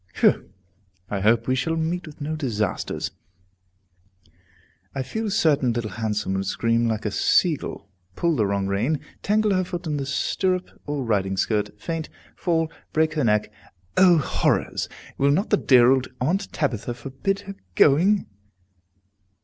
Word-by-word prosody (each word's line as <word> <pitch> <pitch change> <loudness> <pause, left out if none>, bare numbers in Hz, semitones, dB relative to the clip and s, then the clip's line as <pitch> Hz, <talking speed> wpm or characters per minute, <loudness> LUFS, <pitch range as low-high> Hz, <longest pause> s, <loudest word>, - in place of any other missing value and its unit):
Whew! - - +3 0.6
I 100 - -1
hope 115 +3 +3
we 130 - +2
shall 165 +6 0
meet 165 +2 -2
with 150 - -12
no 155 +2 -2
disasters! 115 -9 -2 1.8
I 135 - -1
feel 220 - -3
certain 150 - +2
Little 115 -3 -3
Handsome 105 -2 -2
would 95 0 -2
scream 115 +3 +1
like 110 -1 -2
a 105 - 0
sea 165 - +3
gull, 100 - -8 0.3
pull 170 -2 +1
the 110 -6 +1
wrong 100 0 0
rein, 110 +10 0 0.2
tangle 210 0 +2
her 185 0 +2
foot 175 0 -5
in 150 -2 -1
the 135 -1 -3
stirrup 185 +6 0 0.2
or 145 -2 -2
riding 95 -4 0
skirt, 105 +1 -1
faint, 160 +6 -4 0.3
fall, 165 -2 0 0.2
break 155 0 +2
her 150 -2 0
neck 105 -2 +2 0.4
O 180 -2 +6
horrors! 150 - 0 0.3
Will 140 - +4
not 160 +9 +1
the 210 - +5
dear 125 -5 +6
old 130 -1 +2
Aunt 185 +10 0
Tabitha 120 -4 -2
forbid 135 +11 -3
her 200 0 -8 0.2
going? 185 +8 +4
140 Hz, 155 wpm, -24 LUFS, 110-170 Hz, 1.8 s, O